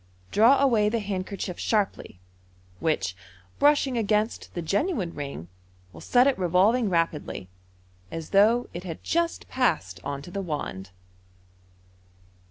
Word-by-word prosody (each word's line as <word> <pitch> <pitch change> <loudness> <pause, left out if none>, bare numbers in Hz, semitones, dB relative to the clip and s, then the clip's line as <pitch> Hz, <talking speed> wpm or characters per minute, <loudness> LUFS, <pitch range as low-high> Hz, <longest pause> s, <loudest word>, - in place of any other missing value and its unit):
" - - -33
draw 235 +6 +5
away 230 -7 +3
the 230 - 0
handkerchief 195 -3 -4
sharply, 205 - -1 0.6
which, 95 - 0 0.4
brushing 285 -4 +3
against 215 +1 0
the 175 - -2
genuine 200 - -1
ring, 140 - -6 0.5
will - - -11
set 250 0 +4
it 275 -6 +2
revolving 195 +6 +3
rapidly, 165 - -1 0.6
as 165 -1 -7
though 220 +5 +4
it 175 - -6
had 165 -4 -7
just 340 0 -1
passed 155 - 0
on 140 -1 -4
to 175 - -10
the 200 - -3
wand. 145 - -5
195 Hz, 130 wpm, -26 LUFS, 165-235 Hz, 0.6 s, draw